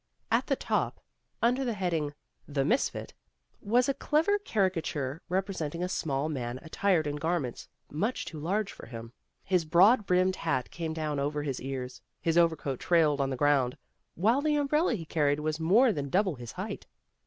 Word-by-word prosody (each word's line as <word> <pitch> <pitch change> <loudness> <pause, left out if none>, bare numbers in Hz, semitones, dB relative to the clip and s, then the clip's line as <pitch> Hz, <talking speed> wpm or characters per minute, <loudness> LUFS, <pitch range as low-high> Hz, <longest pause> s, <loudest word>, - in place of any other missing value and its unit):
At - - +2
the - - +2
top, - - -1 0.4
under 250 +3 +3
the 240 -4 -1
heading, 165 -6 -1 0.3
"The 140 -2 0
Misfit," 245 - 0 0.5
was 240 +4 +2
a 275 - +2
clever 320 +9 +1
caricature 165 - -1
representing 180 -3 -2
a - - 0
small 145 -5 -1
man 125 -5 -3
at 160 +4 -13
tired 185 -6 +2
in 145 0 -2
garments 160 -5 -2 0.2
much 210 - -1
too 155 - -7
large 195 +6 -1
for - - -11
him. 115 0 -9 0.3
His 180 -3 +2
broad 190 +7 +5
brimmed 185 +1 +2
hat 145 -6 -1
came 165 -2 -4
down 155 -3 -2
over 145 +1 -1
his 135 -3 -3
ears, 130 -2 -5 0.2
his 165 -1 0
overcoat 160 -6 +2
trailed 155 -5 +3
on 135 - 0
the 135 - -2
ground, 140 -3 +2 0.4
while 225 - +3
the 300 0 +2
umbrella 295 0 +2
he 165 -6 -6
carried 150 -2 +1
was 155 +1 -2
more 215 +9 +4
than 140 -4 -3
double 190 +3 +2
his 120 -4 -9
height. - - -6
165 Hz, 175 wpm, -29 LUFS, 145-195 Hz, 0.5 s, broad